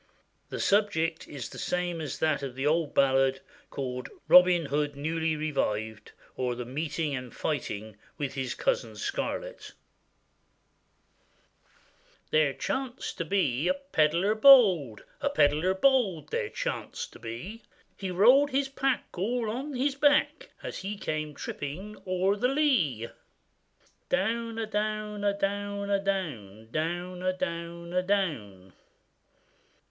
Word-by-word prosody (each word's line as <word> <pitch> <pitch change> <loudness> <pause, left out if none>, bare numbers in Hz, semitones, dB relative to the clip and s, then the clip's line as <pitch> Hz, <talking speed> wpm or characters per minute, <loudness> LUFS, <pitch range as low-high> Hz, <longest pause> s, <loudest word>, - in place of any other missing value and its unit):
The - - -5
subject 195 -6 +1
is 135 -5 -6
the - - -9
same 175 -2 -1
as 145 -4 -4
that 155 -3 +1
of 135 -3 -5
the 135 +1 -3
old 155 0 +1
ballad 135 -1 +3 0.3
called 125 -2 -4 0.2
Robin 180 -2 +7
Hood 145 +1 -1
newly 160 +2 -1
revived; 110 -8 -2 0.2
or, 125 -1 -1
the 125 0 -5
Meeting 150 +3 -2
and 125 -2 -6
Fighting 110 -8 -4 0.2
with 145 -3 -3
his 135 -2 -3
Cousin - - -1
Scarlett.] - - -4 2.6
THERE 155 -3 +3
chanced 265 - -4
to 170 - -1
be 155 -5 +1
a 275 - +3
pedlar 190 - +1
bold, 205 - +6 0.2
A 285 - +1
pedlar 160 - +3
bold 220 - +2
he 470 -2 -1
chanced - - -4
to - - -13
be; 125 - -7 0.3
He 195 - -5
rolled 245 +11 +5
his 270 0 0
pack 270 -1 0
all 225 +4 -1
on 270 +5 -4
his 270 +3 +1
back, 290 +1 +2
And - - -5
he 200 +2 -5
came 155 -4 -3
tripping 180 +13 -6
o'er 185 +2 +2
the 235 +5 +1
lee. 240 - +1 1.0
Down, 230 +4 0
a 225 - -1
down, 215 0 -2
a 200 -1 +1
down, 200 0 -2
a 200 - +3
down, 115 - -3
Down, 175 +4 -3
a 185 0 +1
down, 170 -1 -5
a 180 - +2
down. 120 - -2
180 Hz, 130 wpm, -28 LUFS, 145-215 Hz, 2.6 s, Robin